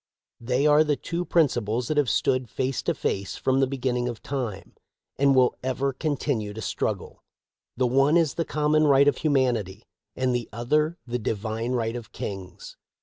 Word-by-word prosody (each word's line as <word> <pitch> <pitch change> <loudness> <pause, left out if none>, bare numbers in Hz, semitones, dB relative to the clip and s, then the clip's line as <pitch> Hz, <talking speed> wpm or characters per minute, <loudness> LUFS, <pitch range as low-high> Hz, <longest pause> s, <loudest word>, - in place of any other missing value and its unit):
They 125 +4 0
are 150 +1 +6
the 150 -1 +1
two 170 +5 -3
principles 120 -9 +1
that 155 - -1
have 145 -5 +3
stood 130 +2 +1
face 130 0 -2
to - - -1
face 100 -1 -2
from 130 0 +1
the 135 - +3
beginning 125 -2 -1
of 115 -3 -8
time, 125 -8 -4 0.5
and 140 -1 +4
will 125 -1 +4
ever 130 +1 -1
continue 135 -7 -2
to 110 - -6
struggle. - - -3 0.5
The 130 - +2
one 135 +6 +4
is 160 -5 +2
the 165 - -1
common 150 0 +2
right 140 0 +5
of 145 - +3
humanity, 120 - 0 0.3
and 130 -1 0
the 120 -1 -2
other 150 - 0
the 125 0 -3
divine 110 +2 -2
right 115 -1 -1
of 120 -3 -8
kings. 95 -3 -7
130 Hz, 175 wpm, -25 LUFS, 115-145 Hz, 0.5 s, are